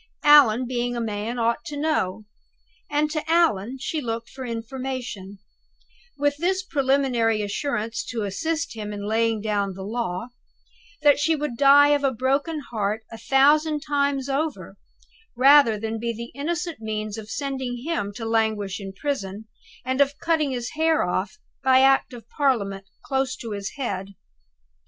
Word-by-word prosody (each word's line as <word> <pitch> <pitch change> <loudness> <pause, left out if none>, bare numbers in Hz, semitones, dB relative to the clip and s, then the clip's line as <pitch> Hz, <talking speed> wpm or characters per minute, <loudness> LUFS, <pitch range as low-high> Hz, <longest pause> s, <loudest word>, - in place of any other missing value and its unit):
Allan, 270 -6 +7
being 245 0 -2
a - - -2
man, 220 +1 -3
ought 235 +5 0
to 295 - -6
know; 220 -10 -1 0.6
and 300 +1 +1
to 310 -1 -2
Allan 270 - +2
she 300 +4 -3
looked 230 -2 -4
for 265 - -8
information 235 -4 -5 0.8
with 290 0 +1
this 375 +4 0
preliminary 265 - +1
assurance 225 +1 -2
to 230 -3 -3
assist 315 +12 -2
him 210 -2 -6
in 205 0 -5
laying 225 0 +1
down 200 -3 -1
the 190 - -7
law, 220 0 -3 0.7
that 290 -1 +5
she 320 +2 +2
would 295 -4 -3
die 285 +3 +7
of 290 -1 +2
a 275 - +3
broken 275 +6 -1
heart 215 0 -1
a 225 - -8
thousand 295 +5 +3
times 280 -2 0
over, 290 +3 -3 0.6
rather 260 -4 +6
than 225 +1 -3
be 235 +1 -2
the 235 +1 -7
innocent 335 +2 -3
means 215 -1 -4
of 220 -1 -8
sending 260 -3 -4
him 305 -11 -2
to 225 -1 -5
languish 220 -4 0
in 195 -1 -7
prison, 210 -4 -4 0.4
and 260 +2 +1
of 280 +1 +2
cutting 320 -3 +1
his 245 -2 -4
hair 320 0 +2
off, 190 +4 -2 0.3
by 260 -1 +5
Act 270 0 +4
of 240 -2 -11
Parliament, 200 -9 0 0.2
close 265 -1 -1
to 230 -3 -7
his 200 -1 -4
head. 200 -7 -4
245 Hz, 155 wpm, -24 LUFS, 220-285 Hz, 0.8 s, Allan